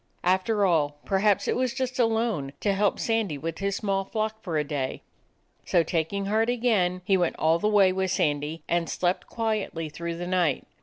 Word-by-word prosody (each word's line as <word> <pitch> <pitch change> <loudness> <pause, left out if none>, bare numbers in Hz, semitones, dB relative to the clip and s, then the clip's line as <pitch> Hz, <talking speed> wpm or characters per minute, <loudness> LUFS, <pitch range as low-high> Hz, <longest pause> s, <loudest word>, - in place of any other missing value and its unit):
After 190 +3 +2
all, 150 -5 +1
perhaps 200 +1 +2
it - - +1
was 255 0 0
just 260 0 -3
a 240 - +5
loan, 220 -12 -1
to 200 - +2
help 200 0 +1
Sandy 225 -9 0
with 165 +3 -5
his 200 0 -1
small 195 -1 -1
flock 220 +2 -3
for 170 -6 -2
a 150 - +1
day. 140 -3 -3 0.6
So, 175 -2 +2
taking 170 +5 -1
heart 220 +3 +1
again, 210 -7 +1
he 195 0 +3
went 175 -2 0
all 160 +2 +2
the 210 - +1
way 200 -3 +5
with 190 0 -1
Sandy, 150 -2 -1
and 170 -1 0
slept 180 0 -1
quietly 215 -8 -2
through 170 +2 -5
the 175 - -4
night. 175 -6 +1
190 Hz, 195 wpm, -26 LUFS, 165-215 Hz, 0.6 s, a